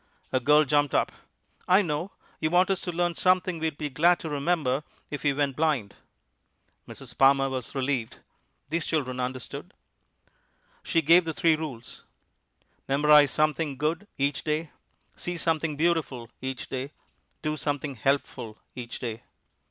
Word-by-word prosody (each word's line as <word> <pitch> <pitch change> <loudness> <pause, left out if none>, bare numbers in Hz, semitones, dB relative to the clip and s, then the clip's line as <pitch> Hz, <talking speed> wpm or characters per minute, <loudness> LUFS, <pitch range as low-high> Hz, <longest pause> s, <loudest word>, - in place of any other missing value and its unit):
A 130 - +3
girl 150 +4 +5
jumped 145 0 +2
up. - - +2 0.6
"I 190 +3 +5
know; 160 +2 -2 0.3
you 155 - 0
want 180 +3 +4
us 190 - 0
to 175 - -3
learn 175 0 0
something 185 -1 +2
we'd 160 -2 -2
be 150 -2 -4
glad 170 +6 +4
to 160 - -5
remember 145 -2 0 0.3
if 145 - -4
we 145 - +2
went 140 -1 0
blind." 145 -10 0 0.9
Mrs. 120 -3 -9
Palmer 135 0 +4
was 130 0 -5
relieved; 130 -4 -1 0.5
these 165 +1 -1
children 130 -5 -1
understood. 125 0 -5 1.1
She 165 - +1
gave 170 +4 +6
the 160 -1 -3
three 165 -2 +4
rules 140 -7 -8 0.8
memorize 145 +1 +6
something 155 0 0
good 160 +7 -1
each 140 +1 0
day, 155 0 -2 0.4
see 175 0 -4
something 160 -2 0
beautiful 145 -7 0
each 130 -1 -4
day, 135 +3 -5 0.5
do 155 0 0
something 145 0 -2
helpful 125 -3 -1 0.2
each 120 -2 -6
day. 115 -1 -5
150 Hz, 145 wpm, -27 LUFS, 130-160 Hz, 1.1 s, gave